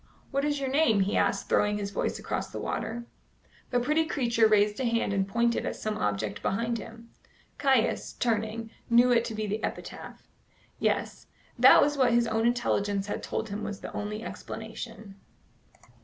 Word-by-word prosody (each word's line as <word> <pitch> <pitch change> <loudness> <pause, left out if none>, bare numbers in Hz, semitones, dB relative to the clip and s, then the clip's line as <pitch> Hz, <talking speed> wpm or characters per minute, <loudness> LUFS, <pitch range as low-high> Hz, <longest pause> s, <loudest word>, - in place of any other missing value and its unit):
"What 275 +1 0
is 290 -1 0
your 270 - -2
name?" 265 -8 +3
he 195 +2 0
asked, - - +1
throwing 210 0 +2
his 200 -1 -4
voice - - -2
across - - -3
the - - -7
water. 235 +1 -3 0.6
The 245 - +2
pretty 300 +6 +2
creature 235 -6 +2
raised 210 0 +3
a - - -1
hand 230 -4 +1
and 195 -1 0
pointed 235 +3 +1
at - - -3
some 215 0 -3
object 105 - -2
behind 230 +3 -1
him. 230 +1 -11 0.5
Caius, 265 -5 +2
turning, 225 -1 -1 0.2
knew 240 +1 +5
it 235 -1 +4
to 225 - -5
be 215 0 -2
the 210 +2 -3
epitaph. - - -6 0.5
Yes, - - -1 0.3
that - - +8
was 290 0 0
what 250 -3 +4
his 235 0 +4
own 225 0 +1
intelligence 205 -5 0
had 205 - -4
told 220 - -3
him 205 +2 -4
was 205 - -5
the - - -7
only 210 +1 -4
explanation. 220 -3 -8
225 Hz, 175 wpm, -28 LUFS, 210-240 Hz, 0.6 s, that